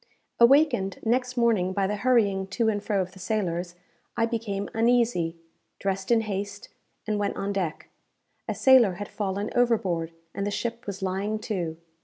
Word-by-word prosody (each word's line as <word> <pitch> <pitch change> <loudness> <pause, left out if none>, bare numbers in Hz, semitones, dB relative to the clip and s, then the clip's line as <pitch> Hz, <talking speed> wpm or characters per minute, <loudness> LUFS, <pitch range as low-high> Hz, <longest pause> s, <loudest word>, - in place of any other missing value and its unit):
Awakened 240 -6 +4
next 250 +2 0
morning 215 -6 +2
by 195 0 +1
the 205 +2 -1
hurrying 205 -6 +2
to 220 +3 +1
and 205 -2 -1
fro 200 -2 0
of 180 - -10
the 190 - -15
sailors, 175 -3 -2 0.4
I 230 - +3
became 215 -4 -3
uneasy, 225 -8 +2 0.4
dressed 195 -1 -2
in 235 -1 +4
haste, 205 -1 -5 0.4
and 215 -1 -1
went 205 -1 -1
on 200 +1 -2
deck. 180 -5 -3 0.6
A - - -2
sailor 255 -7 +6
had 205 +3 -6
fallen 200 0 -3
overboard, 195 -9 +1 0.2
and 200 - -3
the 205 - 0
ship 235 +2 -4
was 200 0 -5
lying 195 +3 -1
to. 170 -5 -2
205 Hz, 165 wpm, -26 LUFS, 190-230 Hz, 0.6 s, sailor